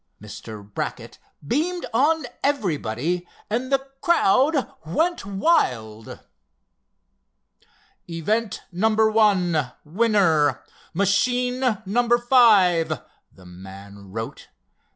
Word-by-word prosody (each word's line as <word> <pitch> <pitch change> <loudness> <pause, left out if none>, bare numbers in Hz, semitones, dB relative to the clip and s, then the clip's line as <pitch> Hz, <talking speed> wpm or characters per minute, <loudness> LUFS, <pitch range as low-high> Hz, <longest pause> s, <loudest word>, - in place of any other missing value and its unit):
Mr. 105 0 -10
Brackett 105 - -6 0.3
beamed 345 - -1
on 300 +5 +2 0.2
everybody, 175 - -1 0.2
and 250 +4 -2
the 270 0 +1 0.2
crowd 275 - +2
went 320 - -1
wild. 125 - -1 1.9
"Event 205 +7 -2
No. 190 +5 +1
1—Winner, 190 - +2 0.3
Machine 245 +4 +1
number 240 +4 +2
five," 200 -10 +4 0.3
the 95 - -19
man 95 +2 -12
wrote. 115 +2 -7
200 Hz, 75 wpm, -23 LUFS, 150-245 Hz, 1.9 s, five